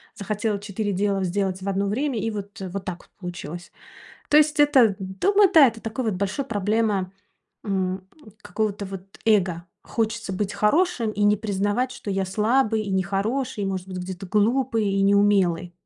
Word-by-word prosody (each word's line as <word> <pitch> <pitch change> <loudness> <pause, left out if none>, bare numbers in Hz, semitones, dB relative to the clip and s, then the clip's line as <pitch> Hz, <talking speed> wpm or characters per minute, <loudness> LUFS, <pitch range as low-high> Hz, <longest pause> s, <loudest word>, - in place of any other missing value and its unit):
захотела 210 +1 -2
4 205 +1 -3
дела 195 0 0
сделать 190 0 -1
в 195 - -3
одно 195 +1 0
время, 255 +4 -1
и 225 - -1
вот, 205 +1 -7
вот 190 0 -5
так 180 -2 -4
вот - - -25
получилось. 175 -2 -7 0.6
То 295 - +6
есть 305 0 +3
это 260 -8 +5
дома, 290 - +2
да, 310 -5 +9
это 225 -1 -4
такой 225 +3 -4
вот 220 - 0
большой 200 +8 -2
проблема, 210 -3 0 0.5
м, 190 -2 -2 0.4
какого-то 205 +1 -2
вот 195 0 -9
эго. 190 -6 +2 0.2
Хочется 225 -2 -2
быть 200 +1 -2
хорошим 240 0 +2
и 210 - -2
не 205 0 +4
признавать, 205 +4 -1
что 205 - -7
я 195 0 0
слабый 220 +3 +1
и 205 - -5
нехороший, 205 +6 -1
может 190 -1 -3
быть, 185 - -6
где-то 185 +1 -6
глупый 225 +3 +1
и 195 0 0
неумелый. 195 -4 +3
205 Hz, 165 wpm, -24 LUFS, 190-225 Hz, 0.6 s, да